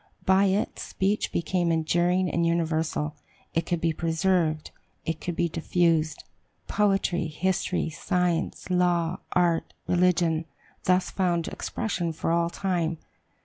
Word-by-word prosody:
By 190 +1 +5
it 195 +2 0
speech 200 +3 -1
became 175 +1 0
enduring 175 +3 +2
and 170 0 0
universal; 160 -2 0 0.4
it 165 0 0
could 175 - 0
be 165 0 +1
preserved, 165 -1 0 0.3
it 165 -1 -3
could 175 - -3
be 170 - +1
diffused. 165 -1 +1 0.4
Poetry, 195 -4 +1
history, 180 +1 -1
science, 180 +1 -1
law, 175 -1 +2
art, 175 -2 +1
religion, 175 -2 +2 0.4
thus 185 0 +2
found 175 -3 0
expression 175 -7 -3
for 160 - -2
all 170 0 +2
time. 170 -3 -1
170 Hz, 120 wpm, -26 LUFS, 165-180 Hz, 0.4 s, By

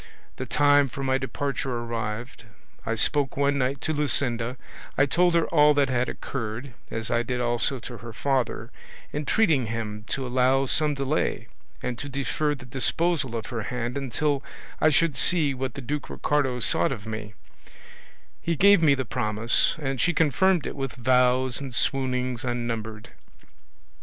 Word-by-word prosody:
The - - -5
time 145 -1 +4
for 135 +3 -6
my 130 0 +1
departure 135 +1 -3
arrived; 115 +1 -5 0.4
I 115 - 0
spoke 140 +4 +1
one 140 0 +2
night 135 +1 -1
to 160 - -1
Luscinda, 130 -4 0 0.4
I 140 - +5
told 175 +5 +2
her 170 - +3
all 150 -2 +5
that 140 -2 +2
had 125 0 0
occurred, 120 +1 -5 0.2
as 115 -1 -4
I 120 - +2
did 125 +1 -3
also 120 +3 +1
to 120 0 -8
her 115 0 -9
father, 130 +2 -1 0.4
entreating 150 - +2
him 110 -2 -4
to 135 - -2
allow 130 +2 +2
some 150 +2 +1
delay, 140 +2 -1 0.3
and 125 -2 -3
to 145 - -5
defer 140 +3 -1
the 135 - -12
disposal 135 +1 0
of 115 - -3
her 115 - -2
hand 120 +2 -3
until 140 +1 -1 0.4
I 155 - +5
should 155 -2 +2
see 155 -4 +3
what 130 -2 -4
the 140 - -5
Duke 145 +4 -4
Ricardo 135 -4 0
sought 85 -2 +2
of 110 -6 -5
me: 110 -2 -6 1.1
he 170 - -1
gave 200 +2 +6
me 145 -4 +5
the 130 -1 -3
promise, 105 +2 +1
and 135 -4 -2
she 175 - +2
confirmed 175 +2 +3
it - - -4
with 135 -2 -4
vows 125 +1 +2
and 135 -4 -6
swoonings 125 0 0
unnumbered. 115 -3 -4
130 Hz, 160 wpm, -25 LUFS, 120-145 Hz, 1.1 s, gave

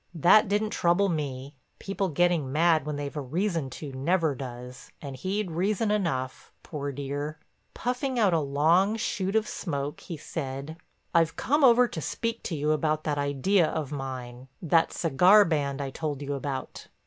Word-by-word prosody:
That 185 +7 +5
didn't 210 +2 0
trouble 175 +3 +2
me; 140 -4 -4 0.2
people 195 -1 -2
getting 165 -3 +1
mad 160 0 +3
when 150 - -2
they've 145 0 -5
a 150 - -2
reason 165 +1 -1
to 140 +1 -8
never 160 +3 +1
does, 125 0 -9
and 140 -2 -7
he'd 190 +6 -2
reason 205 +5 0
enough, 145 -11 -2
poor 145 -2 -5
dear. 145 +2 -4 0.4
Puffing 250 +1 -2
out 205 -6 +3
a 165 - +3
long 160 +8 +2
shoot 195 -3 -2
of 220 -1 +2
smoke, 145 -4 -4
he 170 - -7
said: 140 0 -6 0.4
"I've 165 -1 +3
come 295 +2 +1
over 245 -1 +6
to 160 - -5
speak 230 - -3
to 170 - -2
you 150 +1 0
about 155 0 0
that 145 -1 -1
idea 145 +6 +2
of 155 -3 -3
mine—that 135 +4 -2
cigar 180 +7 +5
band 145 -4 -1
I 135 - -5
told 145 -1 -4
you 145 0 -3
about." 135 -1 -5
155 Hz, 165 wpm, -27 LUFS, 140-185 Hz, 0.4 s, over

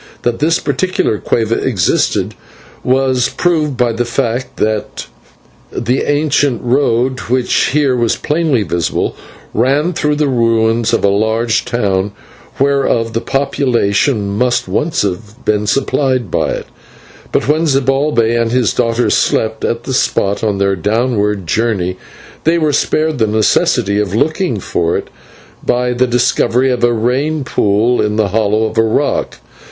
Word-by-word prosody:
That 120 -1 -1
this 165 +3 +2
particular 145 - -1
/cueva/ 115 0 0
existed 105 -10 0 0.5
was 130 -1 +1
proved 155 -6 0
by 125 -1 +2
the 115 +2 -1
fact 120 +1 -2
that 110 -1 -2 0.7
the 125 +3 -1
ancient 145 -3 +1
road, 125 0 +1
which 125 0 +1
here 140 -2 +1
was 120 -2 +1
plainly 150 -7 0
visible, 85 -2 -2 0.4
ran 140 +9 +1
through 150 -2 0
the 150 0 +1
ruins 115 -2 +1
of 115 - 0
a - - +4
large 110 +3 0
town 100 -5 -1 0.5
whereof 135 -5 +1
the 115 - -1
population 120 -6 0
must 120 0 0
once 155 - 0
have 105 +4 -5
been 105 0 0
supplied 130 - 0
by - - 0
it; - - -4 0.7
but - - 0
when 155 +3 +2
Zibalbay 135 -4 +1
and 115 -1 -1
his 120 -5 +1
daughter 115 0 +1
slept 110 0 0
at 115 0 -1
the 130 - -4
spot 100 -5 0
on 105 -3 0
their 100 0 +1
downward 105 0 0
journey, 95 -3 -1 0.5
they 165 +2 +2
were 155 -3 +1
spared 155 -1 0
the 110 - +2
necessity 105 -1 +1
of 105 -2 -1
looking 155 - 0
for 85 -2 -1
it - - -7 0.5
by 125 0 0
the 125 +1 +1
discovery 125 +1 +1
of 125 - -2
a 120 - +4
rain 130 +7 0
pool 110 +1 +1
in 105 0 0
the 105 -2 +1
hollow 110 +1 +1
of 110 - -2
a - - +6
rock. 115 +6 0
120 Hz, 145 wpm, -14 LUFS, 110-135 Hz, 0.7 s, a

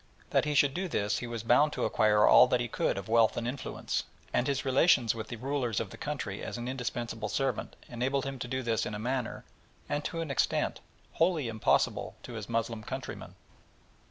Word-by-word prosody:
That - - +3
he 150 0 -1
should 140 -1 +4
do 185 +4 -2
this 105 - 0
he 120 - -5
was 115 -2 -5
bound 145 +6 +4
to - - -1
acquire 105 -1 +4
all 125 - +8
that 125 0 +2
he 120 - -1
could 110 - -1
of 100 - -5
wealth 115 -1 +4
and 120 - -2
influence, 130 +3 -3 0.3
and 120 - +2
his 140 -1 -1
relations 130 -3 +4
with 110 -1 -6
the - - -5
rulers 125 -2 -1
of 105 -4 -4
the - - -8
country 140 -9 -4
as - - -5
an 120 +1 -5
indispensable 120 -3 -3
servant 135 -4 -1
enabled 130 +3 -1
him 135 -1 -5
to 125 - -4
do 130 +1 -2
this 115 -2 0
in 105 - -4
a - - -3
manner, 125 +2 -3 0.4
and 145 - -1
to 165 - -3
an 160 -4 -3
extent, 135 - 0 0.3
wholly 165 -5 +1
impossible 110 -1 +1
to 125 - -8
his 110 -2 -6
Moslem 115 -1 -1
countrymen. - - -7
120 Hz, 210 wpm, -30 LUFS, 115-135 Hz, 0.4 s, all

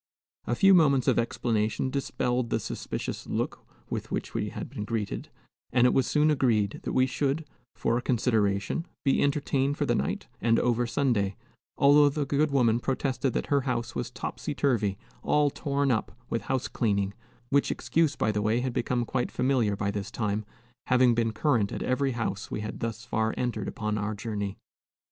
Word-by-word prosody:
A 120 - +1
few 195 +9 +6
moments 140 -8 +4
of - - +4
explanation 115 +1 0
dispelled 125 -3 -1
the - - +1
suspicious - - -5
look - - -2 0.2
with - - -4
which - - -3
we - - -1
had - - -6
been 105 - -6
greeted, 110 -1 -3 0.4
and 125 0 +4
it 125 - +4
was 135 - +2
soon 150 +1 +3
agreed 115 -8 +1
that - - -4
we 130 - +4
should, 140 +4 -1 0.3
for 115 +1 +1
a - - -5
consideration, 110 - +1 0.2
be 135 - +3
entertained 140 0 +1
for 145 - 0
the - - +2
night 70 - -1 0.2
and 115 -1 +3
over 120 0 +1
Sunday; 115 -7 +1 0.4
although 145 +1 +6
the 145 0 -2
good 145 +2 +2
woman 120 -5 +3
protested 135 0 -1
that - - -1
her 140 - +4
house 120 -3 -2
was - - -3
"topsy - - -5
turvy, 105 -8 +1 0.2
all 150 -1 +2
torn 140 -2 0
up" 110 - -2
with 115 - 0
house 130 -1 0
cleaning, 100 -4 0 0.4
which 140 0 +3
excuse, 145 +4 +1
by 110 - +1
the 105 0 -1
way, 110 +3 +1
had 130 -1 -2
become 120 0 0
quite 125 +1 -1
familiar 125 -6 +1
by 100 0 -1
this 100 -1 -4
time, 105 -1 -2 0.4
having 125 -1 +5
been 115 -1 +1
current 110 -3 +1
at - - -3
every 135 +1 +1
house 115 -4 -3
we - - -3
had 105 - -5
thus 115 -1 -4
far 110 0 0
entered 120 -4 -2
upon 105 0 -2
our 105 +1 -2
journey. 100 -2 -4
120 Hz, 185 wpm, -28 LUFS, 110-135 Hz, 0.4 s, few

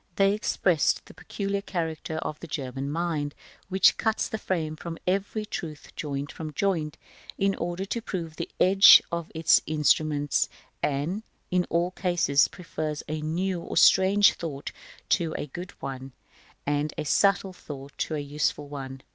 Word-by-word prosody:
They 195 0 +4
express 180 -6 +2
the - - -14
peculiar 200 -1 -3
character 160 -4 -3
of 155 -1 -4
the 170 - -8
German 135 -2 -4
mind, 155 -2 -2 0.3
which 190 -1 +5
cuts 220 -1 0
the 220 - -3
frame 160 -6 -2
of 170 -1 -5
every 200 +3 -1
truth 160 -7 -7
joint 140 -1 -4
from 155 -2 -7
joint, 160 -3 -1 0.4
in 195 0 +2
order 175 +2 -3
to 230 +4 -3
prove 170 -7 -5
the 170 - -4
edge 195 +2 +8
of 170 -1 -3
its 160 0 +5
instruments; 150 -1 +2 0.3
and, 150 +9 -1 0.3
in 180 -1 +2
all 170 +2 +1
cases, 175 -7 +2
prefers 155 -3 -5
a 155 0 -3
new 175 +3 -1
or - - -6
a - - -1
strange 195 +2 +6
thought 145 -5 -6 0.4
to 165 -4 +1
a - - -3
good 175 +6 -7
one, 135 -1 -6 0.5
and 145 +1 -1
a - - -3
subtle 195 +3 +2
thought 140 -5 -9
to 155 - -1
a - - -2
useful 145 0 -1
one. 135 -2 -7
165 Hz, 160 wpm, -27 LUFS, 145-185 Hz, 0.5 s, edge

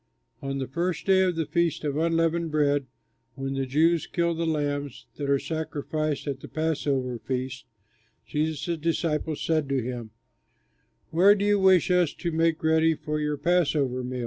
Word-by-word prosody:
On 135 0 -3
the 135 - -2
first 170 +6 -2
day 190 -1 +5
of 185 -2 +2
the 160 -1 -1
Feast 170 -1 0
of 145 -2 -1
Unleavened 165 +1 +1
Bread, 145 -3 +1 0.5
when 135 0 -4
the 135 -1 -2
Jews 160 +5 +2
kill 170 -1 0
the 165 0 -2
lambs 145 -3 -2
that 140 -1 -3
are 140 - +4
sacrificed 155 -1 -3
at 140 -2 -3
the - - -10
Passover 140 -6 -1
Feast, 130 +2 -4 0.6
Jesus' 160 +2 -2
disciples 160 -1 -1
said 155 -3 0
to 135 -1 +1
him, 120 -2 -5 1.0
"Where 190 +5 +6
do 200 0 -1
you 205 0 +3
wish 190 -2 +4
us 180 -4 +2
to 170 - -3
make 165 0 +1
ready 160 0 +3
for 150 0 -3
your 150 -1 -1
passover 145 -6 +1
meal?" 125 0 -4
155 Hz, 170 wpm, -26 LUFS, 140-165 Hz, 1.0 s, Where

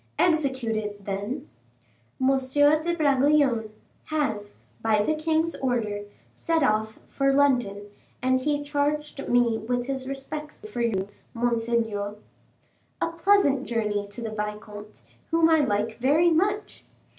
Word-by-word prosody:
"Execute 270 -9 +1
it, 210 -2 -4
then." 205 +9 -4 0.7
"M. 260 0 +3
de 290 +5 +3
Bragelonne 280 -6 +3 0.4
has, 220 -10 -2 0.3
by 215 -2 +2
the 310 - +1
king's 320 +1 0
order, 220 -6 -1 0.3
set 325 -2 0
off 220 -2 +1
for 275 0 +1
London, 250 -8 +2 0.4
and 260 0 +2
he 290 +1 0
charged 290 0 -2
me 240 -2 +3
with 245 +2 -2
his 265 -1 -3
respects 295 +6 -7
for 240 - -2
you; 200 -5 0 0.3
monseigneur." 230 -3 0 0.8
"A 330 - 0
pleasant 335 -6 +3
journey 210 -3 -1
to 205 +4 -8
the 225 - -4
vicomte, 210 0 -6 0.3
whom 330 0 +4
I 320 - +5
like 220 -4 0
very 305 +7 +4
much. 405 +6 0
260 Hz, 125 wpm, -26 LUFS, 220-300 Hz, 0.8 s, I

